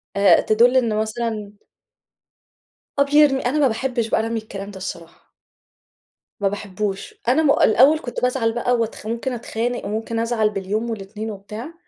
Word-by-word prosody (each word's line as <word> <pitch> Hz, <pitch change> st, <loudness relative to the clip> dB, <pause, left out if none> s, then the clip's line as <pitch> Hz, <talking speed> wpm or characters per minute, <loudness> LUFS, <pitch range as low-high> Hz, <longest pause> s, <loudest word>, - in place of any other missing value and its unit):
آآ، 200 Hz, -3 st, +5 dB
تدل 240 Hz, +4 st, +4 dB
إن 230 Hz, -4 st, +2 dB
مثلًا 215 Hz, -1 st, -3 dB, 1.5 s
آه -, -, +7 dB
بيرمي، 285 Hz, -1 st, +4 dB
أنا 270 Hz, +5 st, +1 dB
ما 280 Hz, -, +5 dB
باحبش 240 Hz, 0 st, -1 dB
بقى 225 Hz, -, +1 dB
رمي 230 Hz, 0 st, -2 dB
الكلام 200 Hz, -2 st, -8 dB
ده 195 Hz, -, -10 dB
الصراحة. 170 Hz, -3 st, -8 dB, 1.1 s
ما 200 Hz, -, +1 dB
باحبوش، 200 Hz, 0 st, -4 dB
أنا 275 Hz, +6 st, +3 dB
م 280 Hz, -, +4 dB
الأول 275 Hz, +6 st, +5 dB
كنت 245 Hz, -, -6 dB
بازعل 250 Hz, -3 st, +1 dB
بقى 245 Hz, +1 st, 0 dB
وأتخ 230 Hz, -2 st, -3 dB
ممكن 235 Hz, +3 st, -2 dB
أتخانق 240 Hz, 0 st, -3 dB
وممكن 225 Hz, +2 st, -3 dB
أزعل 230 Hz, -2 st, +1 dB
باليوم 210 Hz, +3 st, -3 dB
والاتنين 215 Hz, 0 st, -5 dB
وبتاع 210 Hz, +9 st, -8 dB
225 Hz, 150 wpm, -21 LUFS, 210-245 Hz, 1.5 s, آه